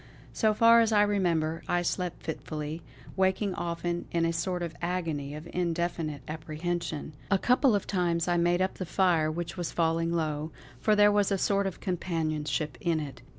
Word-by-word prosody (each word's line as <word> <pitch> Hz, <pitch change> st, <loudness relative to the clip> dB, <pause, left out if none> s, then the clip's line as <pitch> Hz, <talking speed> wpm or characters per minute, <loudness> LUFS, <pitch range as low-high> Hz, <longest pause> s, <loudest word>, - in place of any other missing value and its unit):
So 215 Hz, -2 st, +2 dB
far 230 Hz, +1 st, +7 dB
as 225 Hz, -1 st, +2 dB
I 205 Hz, -1 st, +5 dB
remember, 170 Hz, -6 st, +1 dB
I 175 Hz, 0 st, +1 dB
slept 180 Hz, 0 st, -2 dB
fitfully; 155 Hz, 0 st, -5 dB, 0.3 s
waking 190 Hz, +1 st, +1 dB
often 170 Hz, 0 st, -3 dB
in 170 Hz, -1 st, +1 dB
a 165 Hz, -, 0 dB
sort 180 Hz, +1 st, -2 dB
of 170 Hz, -1 st, -5 dB
agony 165 Hz, -5 st, -2 dB
of 155 Hz, +2 st, -8 dB
indefinite 170 Hz, -4 st, -2 dB
apprehension. 155 Hz, 0 st, -4 dB, 0.2 s
A 195 Hz, -, +4 dB
couple 250 Hz, +3 st, +3 dB
of 200 Hz, -, -1 dB
times 175 Hz, -3 st, 0 dB
I 175 Hz, -, +2 dB
made 175 Hz, +2 st, +3 dB
up 190 Hz, -, -3 dB
the 185 Hz, -, -2 dB
fire 170 Hz, -4 st, +2 dB
which 170 Hz, +2 st, -4 dB
was 175 Hz, -2 st, -3 dB
falling 165 Hz, 0 st, +1 dB
low, 155 Hz, -2 st, -1 dB, 0.3 s
for 215 Hz, -, +3 dB
there 205 Hz, 0 st, +6 dB
was 205 Hz, -1 st, +2 dB
a 195 Hz, -, +2 dB
sort 200 Hz, +1 st, +1 dB
of 190 Hz, -, -6 dB
companionship 155 Hz, -5 st, -2 dB
in 165 Hz, -2 st, +1 dB
it. 140 Hz, -5 st, -7 dB
170 Hz, 180 wpm, -29 LUFS, 160-190 Hz, 0.3 s, far